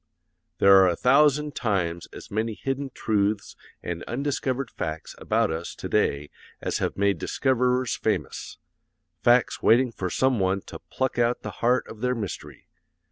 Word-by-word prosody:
There 100 0 +7
are 95 -1 +6
a 85 - +1
thousand 145 - +3
times 85 -7 -1
as - - -11
many 110 +1 -1
hidden 135 +3 -3
truths 105 -4 -1 0.3
and 85 -1 -4
undiscovered 135 0 -2
facts 80 0 -5
about - - +1
us 80 +2 -5
to - - -6
day 70 +1 0 0.3
as - - -2
have - - -2
made 100 -3 +1
discoverers 125 - +1
famous 95 -10 -3 0.6
facts 120 0 +3
waiting 125 +2 +4
for 95 -5 -4
some 130 +4 +1
one 95 +1 +1
to - - -10
'pluck 130 -2 -2
out 120 +1 +1
the - - -5
heart 125 +2 +2
of 110 - -11
their 125 0 +1
mystery.' 105 -7 -7
115 Hz, 155 wpm, -25 LUFS, 95-130 Hz, 0.6 s, There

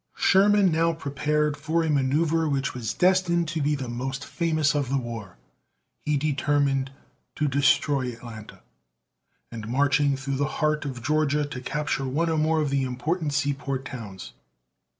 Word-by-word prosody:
Sherman 200 -1 +4
now 165 +1 +2
prepared 150 0 -1
for 160 +3 0
a 160 - -1
manoeuvre 150 +4 +1
which 140 -1 -1
was 120 -4 -3
destined 180 -2 +2
to 160 -1 -2
be 150 +1 +1
the 135 -3 -5
most 130 +3 -4
famous 155 -3 +1
of 145 -4 -1
the 140 - +1
war. 115 -7 -6 0.6
He 150 -1 0
determined 140 -2 +1 0.5
to 150 - 0
destroy 140 -1 +2
Atlanta, 115 -2 -11 0.9
and, 110 -2 -7
marching 140 +2 +2
through 135 0 -3
the 145 +1 +1
heart 150 -1 +1
of 125 -4 -5
Georgia, 150 +1 +1
to 135 -3 -7
capture 135 0 -2
one 165 +6 0
or 160 - +1
more 160 +1 +2
of 145 -2 -1
the 140 -1 +1
important 145 +5 -2
seaport 140 -2 -1
towns. 110 -8 -8
145 Hz, 155 wpm, -25 LUFS, 135-155 Hz, 0.9 s, Sherman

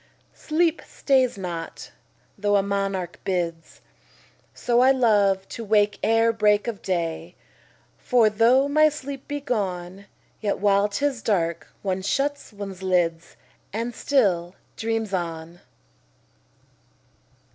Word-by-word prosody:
10 - - -21
Sleep 325 +1 +2
stays 260 -5 +1
not, 170 -3 -6 0.4
though 205 0 +1
a 200 - +3
monarch 195 -3 -2
bids: 170 -3 -3 0.7
So 240 0 0
I 255 +1 +6
love 205 -7 +3
to 230 - -6
wake 210 -1 +2
ere 225 +1 +3
break 210 0 +2
of 225 -4 -4
day: 170 -1 -3 0.6
For 245 -4 +3
though 235 +6 +4
my 305 +2 +4
sleep 280 -2 -8
be 290 0 -3
gone, 195 -7 -3 0.3
Yet 205 -2 -1
while 200 0 +3
'tis 255 +4 -2
dark, 170 -6 -1 0.2
one 190 -1 -1
shuts 280 +8 -1
one's 200 -3 -8
lids, 175 -3 0 0.4
And 230 +3 -3
still 190 -11 +1 0.2
dreams 225 -2 -2
on. 170 -1 -4
205 Hz, 120 wpm, -24 LUFS, 185-240 Hz, 0.7 s, I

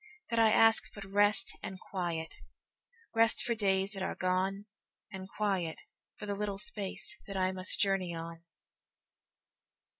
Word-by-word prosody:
That 230 - +2
I 225 -1 +7
ask 225 +1 +5
but 200 -1 -7
rest 205 +2 +2
and 190 0 -6
quiet—Rest 195 - -2
for 235 - +1
days 195 -3 +1
that 195 -2 -5
are - - -1
gone, 190 +2 0 0.5
And 190 -1 -7
quiet 190 -7 -1 0.3
for 210 - -7
the 205 - -1
little 200 -1 -2
spaceThat 195 -1 -3
I 185 0 +2
must 185 0 -1
journey 190 -3 +1
on. 165 0 -7
195 Hz, 130 wpm, -32 LUFS, 185-210 Hz, 0.5 s, I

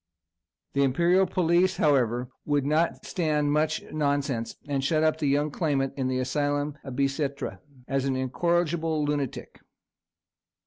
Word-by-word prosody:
The 140 - +1
imperial 170 +8 +3
police, 180 +2 +2
however, 125 -4 +2 0.2
would 145 -2 0
not 155 +3 +1
stand 150 -4 0
much 155 +8 +1
nonsense, 140 -5 -1
and 140 -2 -1
shut 155 +2 +2
up 155 0 +2
the 150 - 0
youthful 145 +2 +1
claimant 140 -5 0
in 130 -2 -1
the 130 0 0
asylum 145 +3 -1
of 135 -2 -7
Bicêtre, 140 +1 -2 0.3
as 135 0 0
an 135 -1 0
incorrigible 160 +3 0
lunatic. 145 -3 -3
145 Hz, 135 wpm, -27 LUFS, 135-160 Hz, 0.3 s, imperial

